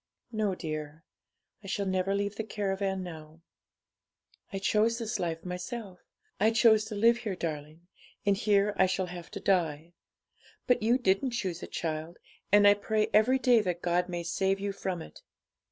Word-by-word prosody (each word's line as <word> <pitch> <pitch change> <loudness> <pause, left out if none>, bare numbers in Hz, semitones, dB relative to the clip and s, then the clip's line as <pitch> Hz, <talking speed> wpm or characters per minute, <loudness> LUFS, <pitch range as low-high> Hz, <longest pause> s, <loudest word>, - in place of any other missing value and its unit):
'No, 215 -4 0
dear; 155 -1 -6 0.6
I - - -9
shall 200 +1 -1
never 190 +1 0
leave 200 0 -2
the 220 - -3
caravan 195 -3 -2
now. 160 -2 -10 1.1
I 195 - -3
chose 215 +4 +2
this 230 -1 -3
life 165 -1 -3
myself; 180 +2 -6 0.4
I 215 +3 +4
chose 225 -1 +4
to 215 -1 -6
live 230 +3 +4
here, 215 -5 -4
darling; 155 0 -5 0.4
and 200 -1 +4
here 205 0 +2
I 190 - +5
shall 190 0 -1
have 175 -1 -9
to - - -7
die. 165 -3 0 0.7
But 250 -2 +2
you 235 +3 +3
didn't 240 +2 +1
choose 185 -7 -3
it, - - -8
child; 160 +1 -4 0.3
and 205 0 +7
I 205 - +8
pray 215 +1 -1
every 225 +5 +5
day 250 -3 +4
that 180 -3 -3
God 180 +1 +1
may 175 -1 -3
save 190 +3 0
you 200 0 -2
from 185 -3 -4
it. - - -14
195 Hz, 170 wpm, -29 LUFS, 175-215 Hz, 1.1 s, I